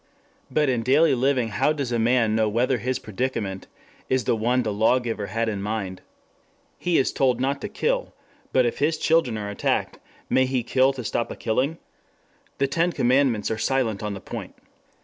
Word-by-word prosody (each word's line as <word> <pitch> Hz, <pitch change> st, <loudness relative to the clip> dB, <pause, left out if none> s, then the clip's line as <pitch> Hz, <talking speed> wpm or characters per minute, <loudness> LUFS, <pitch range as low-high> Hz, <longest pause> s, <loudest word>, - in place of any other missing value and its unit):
But 150 Hz, -1 st, +1 dB
in 125 Hz, -3 st, +1 dB
daily 140 Hz, +7 st, +4 dB
living 130 Hz, -2 st, +1 dB
how 105 Hz, +9 st, +1 dB
does 140 Hz, -5 st, -3 dB
a 120 Hz, -, 0 dB
man 115 Hz, -1 st, +2 dB
know 110 Hz, -1 st, +2 dB
whether 120 Hz, +3 st, +1 dB
his 125 Hz, +4 st, -1 dB
predicament 110 Hz, -3 st, -4 dB, 0.4 s
is 130 Hz, -1 st, +1 dB
the 115 Hz, -, +1 dB
one 120 Hz, +3 st, +1 dB
the 110 Hz, -2 st, -2 dB
law 110 Hz, +5 st, +3 dB
giver 115 Hz, -5 st, -3 dB
had 115 Hz, +3 st, -1 dB
in 105 Hz, -3 st, -2 dB
mind? 100 Hz, -3 st, -4 dB, 0.8 s
He 175 Hz, -2 st, +1 dB
is 130 Hz, -, +1 dB
told 125 Hz, -3 st, +2 dB
not 140 Hz, +2 st, -1 dB
to 210 Hz, -, -4 dB
kill. -, -, -1 dB, 0.4 s
But 130 Hz, -1 st, +3 dB
if 120 Hz, -, -2 dB
his 155 Hz, +3 st, +1 dB
children 160 Hz, -10 st, +2 dB
are 105 Hz, -1 st, -4 dB
attacked, 100 Hz, -, -1 dB, 0.3 s
may 130 Hz, 0 st, +3 dB
he 130 Hz, -2 st, -1 dB
kill 130 Hz, +3 st, +3 dB
to 130 Hz, -2 st, -6 dB
stop 115 Hz, +2 st, -2 dB
a -, -, -6 dB
killing? 130 Hz, +8 st, -1 dB, 0.8 s
The 140 Hz, -, +2 dB
Ten 165 Hz, +6 st, +1 dB
Commandments 125 Hz, -6 st, +2 dB
are 110 Hz, -, -2 dB
silent 115 Hz, -3 st, 0 dB
on 105 Hz, -1 st, -3 dB
the -, -, -7 dB
point. -, -, -7 dB
125 Hz, 190 wpm, -24 LUFS, 110-135 Hz, 0.8 s, daily